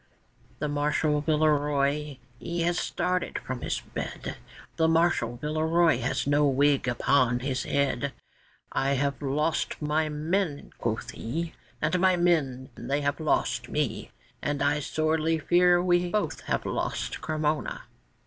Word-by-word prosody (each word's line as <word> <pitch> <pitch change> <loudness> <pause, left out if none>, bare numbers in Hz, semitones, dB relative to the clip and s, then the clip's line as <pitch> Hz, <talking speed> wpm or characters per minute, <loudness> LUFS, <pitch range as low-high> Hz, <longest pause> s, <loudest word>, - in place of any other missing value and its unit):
The 150 - -2
Marshal 150 +1 +1
Villeroy 150 -2 +1 0.2
he 170 0 -3
has 175 +1 +1
started 180 0 -1
from 130 -2 -5
his - - -2
bed; - - -5 0.4
The 160 -1 +3
Marshal 165 -8 +2
Villeroy 155 +1 +2
has 125 +1 -1
no 145 +1 +3
wig 140 0 +3
upon 125 0 +2
his 130 -1 -2
head; 140 -1 0 0.6
'I 135 +1 +1
have 140 +2 -1
lost 150 +3 0
my 155 +1 0
men!' 155 +1 -2
quoth 110 -1 -2
he, 160 +8 -4 0.3
'And 165 +4 +2
my 185 0 +4
men 150 -7 +1
they 140 +2 -2
have 140 +2 -1
lost 155 - 0
me, - - -2 0.3
And 145 -1 -1
I 145 +1 +2
sorely 155 +2 0
fear 175 +2 +4
we 175 -1 +2
both 210 +2 -1
have - - -1
lost - - -2
Cremona. 155 -1 -1
150 Hz, 135 wpm, -27 LUFS, 140-165 Hz, 0.6 s, my